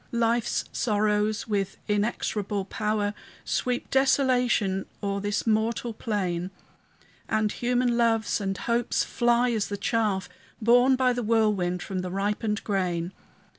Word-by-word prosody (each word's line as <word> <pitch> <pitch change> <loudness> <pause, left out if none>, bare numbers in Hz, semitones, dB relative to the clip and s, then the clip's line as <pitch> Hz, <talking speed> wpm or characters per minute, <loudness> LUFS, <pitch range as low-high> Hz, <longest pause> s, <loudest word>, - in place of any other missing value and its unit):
Life's 235 0 +1
sorrows, 210 -1 0
with 195 -3 -1
inexorable 205 -1 -1
power, 210 0 -1 0.3
Sweep 250 0 -1
desolation 250 -7 +2 0.2
o'er 200 0 -1
this 205 0 -1
mortal 225 +1 0
plain; 185 -6 -2 0.8
And 215 -1 +1
human 245 0 +1
loves 225 -2 +2
and 195 -1 -2
hopes 235 +3 0
fly 240 +1 +2
as 220 -3 0
the 205 - -4
chaff 210 -3 0 0.3
Borne 245 +4 +5
by 255 -1 +2
the 245 - -2
whirlwind 210 -6 +1
from 190 -1 -4
the 180 0 -3
ripened 205 +2 -1
grain. 180 -4 -1
215 Hz, 125 wpm, -26 LUFS, 200-235 Hz, 0.8 s, Borne